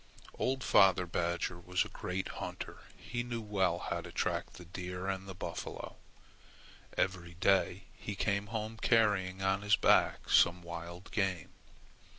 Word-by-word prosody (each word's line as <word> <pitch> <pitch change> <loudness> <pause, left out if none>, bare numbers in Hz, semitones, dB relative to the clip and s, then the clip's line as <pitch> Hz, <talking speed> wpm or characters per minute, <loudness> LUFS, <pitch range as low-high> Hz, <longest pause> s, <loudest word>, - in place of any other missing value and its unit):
Old 130 0 0
father 95 -2 +5
badger 85 +1 -1
was 90 +1 0
a - - -8
great 95 +1 -3
hunter. - - -6 0.2
He 120 0 -4
knew 120 -1 -3
well 95 -5 +1
how - - -3
to - - -9
track - - -1
the 90 - -11
deer 90 +2 -5
and 95 0 -2
buffalo. 85 -2 -5 1.0
Every 90 -2 -1
day 95 +1 +2
he 100 - -6
came 100 +1 0
home 110 0 -4
carrying 95 -5 +2
on 95 +1 +2
his 105 0 +4
back - - +3
some 90 0 +5
wild 85 +2 -7
game. 95 -5 0
95 Hz, 145 wpm, -33 LUFS, 90-105 Hz, 1.0 s, father